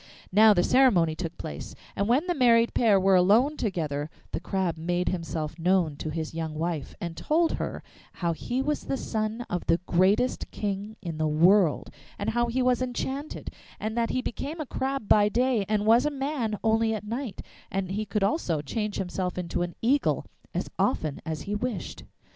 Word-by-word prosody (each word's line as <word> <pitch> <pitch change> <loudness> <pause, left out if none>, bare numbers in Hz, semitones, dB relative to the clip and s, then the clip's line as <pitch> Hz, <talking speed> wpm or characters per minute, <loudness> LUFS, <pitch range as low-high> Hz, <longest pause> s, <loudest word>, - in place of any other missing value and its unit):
Now 215 +3 +7
the 175 - +3
ceremony 200 -12 +4
took 170 -1 -5
place, 70 - -7 0.2
and 200 - 0
when 260 +8 +3
the 355 - 0
married 235 -5 +4
pair 215 -5 +4
were 190 +1 +3
alone 215 +11 +4
together 155 - -2 0.2
the - - -2
Crab 190 -4 -1
made 175 +2 -1
himself 165 -3 -4
known 175 -3 +2
to 155 - -4
his 160 0 -4
young 160 -1 -4
wife, 160 -2 -3
and 170 -1 -5
told 325 - +1
her - - -4 0.3
how 170 -2 -1
he 250 +10 -2
was 300 +1 -2
the 270 - -1
son 220 0 -3
of 180 - -3
the 165 - +4
greatest 195 +9 +2
king 205 +1 -4
in 165 -3 -5
the 155 - +2
world, 170 +2 +3 0.3
and 200 - -1
how 240 +1 +1
he 250 +2 0
was 250 -1 +2
enchanted, 265 +3 -4 0.3
so 215 - -2
that 230 +1 -1
he 255 - -1
became 290 +7 -4
a 310 - -3
crab 265 -3 -3
by 205 -1 +5
day 245 -2 +1
and 210 -1 +1
was 230 +3 +6
a 300 - +1
man 270 -6 -2
only 225 0 +2
at 210 - -6
night; 235 -1 -4 0.3
and 190 -1 -2
he 210 +3 -1
could 210 -1 -1
also 195 - +1
change 210 +7 -3
himself 180 -1 -3
into 175 -1 -2
an 175 0 -3
eagle 275 +5 +2 0.3
as - - -2
often 155 -3 0
as 155 -2 -3
he 205 - -4
wished. 210 -3 -4
205 Hz, 190 wpm, -27 LUFS, 175-240 Hz, 0.3 s, Now